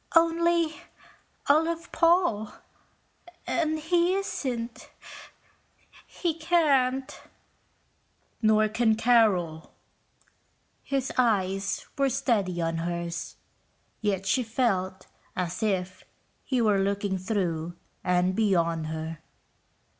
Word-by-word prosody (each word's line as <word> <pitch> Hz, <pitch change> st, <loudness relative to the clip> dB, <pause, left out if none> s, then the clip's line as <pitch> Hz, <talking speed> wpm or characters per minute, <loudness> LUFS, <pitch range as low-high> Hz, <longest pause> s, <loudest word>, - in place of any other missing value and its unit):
"Only 335 Hz, -1 st, +3 dB, 0.7 s
I 285 Hz, +2 st, +5 dB
love 335 Hz, +1 st, -3 dB
Paul, 335 Hz, -, +2 dB, 0.9 s
and 315 Hz, -2 st, 0 dB
he 345 Hz, +3 st, +2 dB
isn't... 250 Hz, -11 st, -4 dB, 1.2 s
he 345 Hz, -3 st, -2 dB
can't...." 280 Hz, -6 st, +1 dB, 1.2 s
"Nor 215 Hz, -1 st, +4 dB
can 220 Hz, 0 st, +2 dB
Carol." 210 Hz, -9 st, +2 dB, 1.1 s
His 270 Hz, -2 st, -2 dB
eyes 195 Hz, -5 st, +1 dB
were 275 Hz, -1 st, +3 dB
steady 200 Hz, -8 st, 0 dB
on 165 Hz, 0 st, -1 dB
hers, 170 Hz, 0 st, -4 dB, 0.7 s
yet 195 Hz, -3 st, -1 dB
she 225 Hz, +7 st, +2 dB
felt 195 Hz, -6 st, -1 dB, 0.3 s
as 180 Hz, -1 st, -3 dB
if 185 Hz, -4 st, -1 dB, 0.4 s
he 255 Hz, -3 st, 0 dB
were 210 Hz, -3 st, +3 dB
looking 200 Hz, 0 st, -1 dB
through 175 Hz, -4 st, -2 dB, 0.3 s
and 180 Hz, +1 st, +2 dB
beyond 170 Hz, -7 st, +1 dB
her. 160 Hz, 0 st, -5 dB
215 Hz, 90 wpm, -27 LUFS, 185-275 Hz, 1.2 s, I